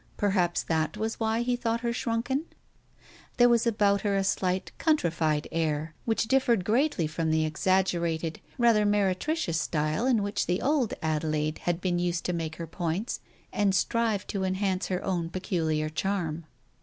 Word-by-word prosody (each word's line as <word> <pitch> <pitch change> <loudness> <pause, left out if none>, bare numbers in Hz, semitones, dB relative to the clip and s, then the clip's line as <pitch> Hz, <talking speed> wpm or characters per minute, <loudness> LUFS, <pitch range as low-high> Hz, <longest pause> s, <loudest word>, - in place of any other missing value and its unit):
Perhaps 185 -4 +1
that 160 +4 -1
was 220 +1 -3
why 225 +1 +1
he 245 0 +1
thought 235 -1 -1
her 235 -1 -1
shrunken? 245 +5 -1 0.9
There 245 0 +7
was 235 0 +3
about 205 -3 +2
her 200 -2 0
a 195 - +2
slight 185 -1 0
countrified 165 - +1
air, 160 -1 -1
which 225 0 +1
differed 235 -6 +2
greatly 235 - +2
from 160 +1 -2
the 160 0 +2
exaggerated, 170 -1 0 0.2
rather 230 -4 +4
meretricious 205 - +1
style 155 +9 0
in 235 -6 +3
which 205 +1 -1
the 180 +2 +1
old 280 -5 +1
Adelaide 155 -1 -1
had 175 -1 +1
been 180 -2 0
used 175 -1 -1
to 180 - 0
make 160 -2 -3
her 170 - -5
points, 170 +6 -3 0.3
and 200 -2 +2
strive 220 0 +1
to 195 -2 -3
enhance 190 0 0
her 185 -1 -2
own 175 -3 -1
peculiar 160 -4 -1
charm. 165 -1 -2
190 Hz, 160 wpm, -28 LUFS, 165-225 Hz, 0.9 s, There